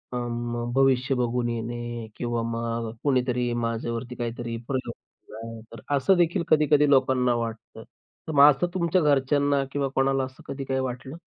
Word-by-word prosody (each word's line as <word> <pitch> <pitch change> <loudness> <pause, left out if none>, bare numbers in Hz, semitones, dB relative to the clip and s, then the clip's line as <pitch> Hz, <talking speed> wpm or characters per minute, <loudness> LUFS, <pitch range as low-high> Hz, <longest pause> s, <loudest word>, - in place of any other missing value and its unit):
अं, 120 0 -3
भविष्य 135 0 +3
बघून 120 -1 0
येणे 120 0 -4
किंवा 120 -1 -2
मग 115 0 -3
कोणीतरी 125 -3 +1
माझ्यावरती 115 +1 -3
काहीतरी 120 -1 -4
प्रयोग 130 -3 -3
केला 110 - -17
आहे. 115 -1 -8
तर 115 - -9 0.2
असं 160 +8 +3
देखील 175 +1 +2
कधी-कधी 150 -2 +4
लोकांना 130 -2 +3
वाटतं. 115 -1 -5 0.4
तर - - -3
मग 145 0 +8
असं 145 +6 -1
तुमच्या 180 0 +1
घरच्यांना 145 -1 +2
किंवा 140 -1 -1
कोणाला 135 0 +2
असं 130 0 -9
कधी 135 0 -5
काही 130 0 -1
वाटलं? 130 +2 -5
125 Hz, 155 wpm, -25 LUFS, 120-140 Hz, 0.4 s, मग